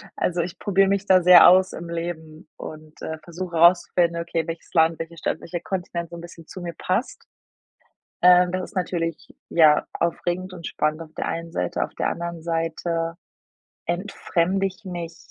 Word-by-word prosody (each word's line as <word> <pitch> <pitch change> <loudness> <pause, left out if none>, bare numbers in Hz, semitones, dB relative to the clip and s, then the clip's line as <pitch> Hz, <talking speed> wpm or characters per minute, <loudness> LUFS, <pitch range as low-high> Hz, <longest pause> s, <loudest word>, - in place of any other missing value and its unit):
Also, 175 -1 0
ich 175 +3 -5
probiere 195 -1 +3
mich 200 0 0
da 185 -2 +5
sehr 180 0 +9
aus 185 +1 +5
im 170 0 -7
Leben 165 -2 -6
und, 155 0 -10
äh, 160 0 -5
versuche 175 +1 -6
rauszufinden: 170 0 +4
„Okay, 170 -1 -2
welches 165 0 -7
Land, 160 -1 +4
welche 165 +1 -7
Stadt, 160 - -2
welcher 175 0 -5
Kontinent 175 -2 -4
so 170 - -9
'n - - -9
bisschen 170 -2 -12
zu 185 - -9
mir 170 -1 -5
passt?” 205 +8 -2 1.0
Ähm, 180 0 +6
das 185 0 -2
ist - - -24
natürlich 165 -3 -3
ja 155 -3 +5
aufregend 175 +2 -2
und 170 -3 -9
spannend 155 +1 -1
auf 160 -1 -17
der - - -3
einen 165 0 -4
Seite, 90 - -1
auf - - -7
der - - 0
anderen 170 -1 -5
Seite 165 0 -2 0.7
entfremde 185 +1 -1
ich 190 +2 -8
mich 170 -3 -6
170 Hz, 175 wpm, -23 LUFS, 165-180 Hz, 1.0 s, sehr